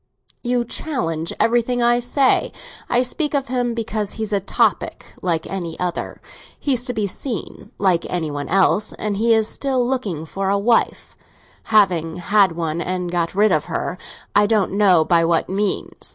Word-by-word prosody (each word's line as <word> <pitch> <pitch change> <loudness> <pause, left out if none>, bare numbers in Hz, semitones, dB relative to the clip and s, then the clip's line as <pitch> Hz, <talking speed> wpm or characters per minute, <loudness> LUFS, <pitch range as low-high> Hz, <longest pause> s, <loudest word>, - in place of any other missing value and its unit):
"You 245 -1 0
challenge 165 - -2
everything 240 +1 +2
I 240 0 +4
say. 255 +2 +2 0.4
I 245 +1 +3
speak 295 +4 -1
of 275 -2 -1
him 245 -2 -1
because 215 -3 -2
he's 220 -1 -4
a 200 - +3
topic, 205 +1 0 0.2
like 170 -3 -1
any 175 -4 -5
other. 180 -1 -3 0.4
He's 255 -4 +1
to 250 - -1
be 215 -3 -1
seen, 225 +4 -5
like 185 -4 +1
any 165 -4 -2
one 145 0 -4
else, 195 +3 +2
and 210 -2 -3
he 225 +2 +4
is 220 -1 +2
still 260 -2 -1
looking 205 - -2
for 195 +4 -3
a 200 - +2
wife—having 200 -5 0
had 190 +1 +3
one 165 0 -2
and 180 -1 -3
got 175 0 -1
rid 210 +1 +4
of 155 -3 +1
her, 180 - -3 0.4
I 205 0 +5
don't 210 -3 +1
know 190 -5 +4
by 170 -1 +3
what 165 0 +1
means. 200 +1 -2
205 Hz, 165 wpm, -20 LUFS, 175-240 Hz, 0.4 s, I